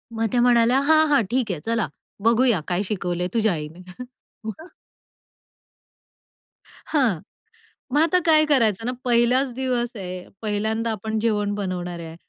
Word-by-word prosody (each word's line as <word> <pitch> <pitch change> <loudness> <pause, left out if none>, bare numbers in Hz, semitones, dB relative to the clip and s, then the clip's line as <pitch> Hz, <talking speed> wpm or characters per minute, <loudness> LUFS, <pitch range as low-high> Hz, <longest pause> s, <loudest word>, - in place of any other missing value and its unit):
मग 225 - 0
त्या 245 - +2
म्हणाल्या, 240 +1 +4
"हां, 315 +2 +4
हां. 285 -4 +4
ठीक 245 -5 0
आहे. 165 - -4
चला, 225 -6 0 0.4
बघूया 230 -3 +3
काय 180 +2 0
शिकवले 180 -3 -2
तुझ्या 220 -4 +2
आईने?" 160 +3 -7 0.6
मग. 270 - -7 2.3
हां. 245 - +2 0.7
मग 295 - +4
आता 335 +3 +3
काय 310 -2 +5
करायचं 225 -7 +2
ना? 250 - 0
पहिलाच 245 +2 +3
दिवस 250 -2 -1
आहे, 185 -2 -7 0.2
पहिल्यांदा 220 +2 -1
आपण 220 +1 -3
जेवण 210 -2 0
बनवणार 180 -3 -4
आहे 165 -1 -8
225 Hz, 135 wpm, -23 LUFS, 190-250 Hz, 2.3 s, काय